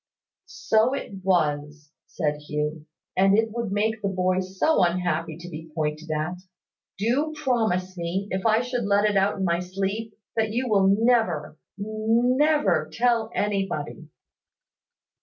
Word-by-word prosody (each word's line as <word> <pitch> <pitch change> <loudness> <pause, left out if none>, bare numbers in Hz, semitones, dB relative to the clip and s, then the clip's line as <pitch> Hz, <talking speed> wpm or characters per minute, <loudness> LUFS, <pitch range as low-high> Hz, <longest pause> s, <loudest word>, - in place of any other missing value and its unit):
"So 265 -5 +1
it 195 -7 -7
was," 150 -4 0 0.2
said 150 -4 -2
Hugh; 150 +1 -4 0.3
"and 195 +2 +4
it 225 0 +1
would 230 -3 -3
make 215 +2 0
the 200 - 0
boy 185 -1 +1
so 190 +9 +1
unhappy 170 -2 0
to 170 +1 -10
be 160 -1 -8
pointed 155 0 -2
at! 155 +4 -2 0.6
Do 260 +10 0
promise 220 -10 0
me, 180 +3 -3
if 190 0 -2
I 220 0 +3
should 245 -2 -2
let 200 +1 +3
it 205 - 0
out 195 +1 +2
in 190 - -1
my 170 -1 +1
sleep, 195 +4 -3 0.2
that 220 -1 +1
you 245 +4 -1
will 200 -4 +3
never, 210 -7 +2 0.2
never 220 - +2
tell 230 +1 +1
anybody." 195 -6 -2
195 Hz, 140 wpm, -25 LUFS, 170-225 Hz, 0.6 s, and